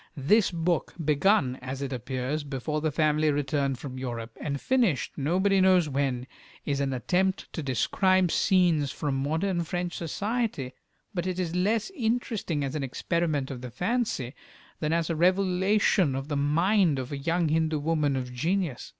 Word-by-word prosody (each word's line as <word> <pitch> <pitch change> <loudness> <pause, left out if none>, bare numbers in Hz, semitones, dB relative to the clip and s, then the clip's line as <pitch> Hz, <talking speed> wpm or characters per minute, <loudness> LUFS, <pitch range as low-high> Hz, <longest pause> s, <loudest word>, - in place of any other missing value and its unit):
This 195 +10 +3
book, 170 -1 -1
begun, 150 -3 +3
as 130 +2 -5
it 135 -1 -3
appears, 130 +4 -3
before 145 +2 -3
the 155 0 0
family 155 +1 +2
returned 140 -2 0
from 130 -1 -7
Europe, 115 -3 -5
and 140 -2 -2
finished 235 - +1
nobody 190 +7 +2
knows 185 -3 +5
when, 135 -3 -1 0.4
is 140 -1 -1
an 140 -1 0
attempt 185 - 0
to 160 - -3
describe 180 - +2
scenes 175 -8 +3
from 145 -3 -2
modern 165 +7 0
French 175 +1 -3
society, 200 - -2 0.4
but 180 -1 -2
it 185 -1 -2
is 170 -2 -2
less 210 - +1
interesting 225 - -1
as 135 0 -3
an 155 - -2
experiment 145 +1 -1
of 125 -2 -6
the 125 - -6
fancy, 180 - -1 0.5
than 155 -1 -1
as 165 0 +1
a - - -1
revelation 185 -2 +2
of 135 +2 -4
the 145 - -1
mind 165 +4 +2
of 130 +1 -5
a 140 - -3
young 165 +2 0
Hindu 160 0 +1
woman 150 -2 0
of 125 -1 -4
genius. 165 +1 -1
155 Hz, 165 wpm, -27 LUFS, 135-185 Hz, 0.5 s, knows